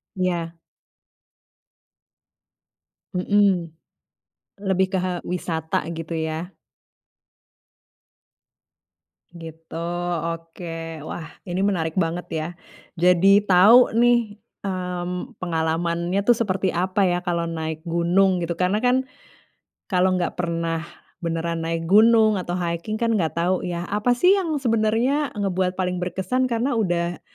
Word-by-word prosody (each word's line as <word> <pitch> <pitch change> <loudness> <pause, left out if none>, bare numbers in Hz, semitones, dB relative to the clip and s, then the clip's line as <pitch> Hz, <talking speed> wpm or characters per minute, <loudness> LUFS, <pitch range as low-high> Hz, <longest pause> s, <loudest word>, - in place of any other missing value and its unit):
Iya. 175 -3 -2 2.6
Mhm, 185 -3 +2 0.9
lebih 190 -1 +2
ke, 190 - +1
eee, 180 -1 -2
wisata 165 -3 -2
gitu, 165 0 -5
ya. 160 +3 -3 2.8
Gitu, 165 -2 -11 0.5
oke. 165 -1 -6
Wah, 160 - -6 0.2
ini 180 +2 -2
menarik 170 -5 0
banget, 175 -1 -1
ya, 155 - -3 0.5
jadi 180 +3 +5
tahu, 220 +6 +6
nih, 235 -3 +3 0.2
mmm, 180 -2 -4
pengalamannya 170 +2 -1
tuh 240 - +6
seperti 195 -4 -1
apa, 185 +2 +1
ya, 175 0 0
kalau 170 -2 -1
naik 160 -1 -4
gunung 175 +2 +2
gitu 170 +1 -4
karena, 200 +6 +1
kan, 260 +1 +2 0.8
kalau 185 -1 +2
enggak 175 -1 -1
pernah 165 -1 -1 0.4
beneran 165 0 -2
naik 165 0 -2
gunung 215 +2 +5
atau 175 0 -3
hiking 170 +4 -3
kan, 230 0 0
enggak 170 -6 0
tahu, 180 +2 +1
ya, 175 0 -3
apa 230 +4 +2
sih 360 +10 +5
yang 325 -5 -2
sebenarnya 240 +4 +1
ngebuat 185 -2 -1
paling 180 -1 -1
berkesan 190 +9 -1
karena 240 +3 0
udah 175 -6 -1
180 Hz, 110 wpm, -23 LUFS, 170-205 Hz, 2.8 s, tahu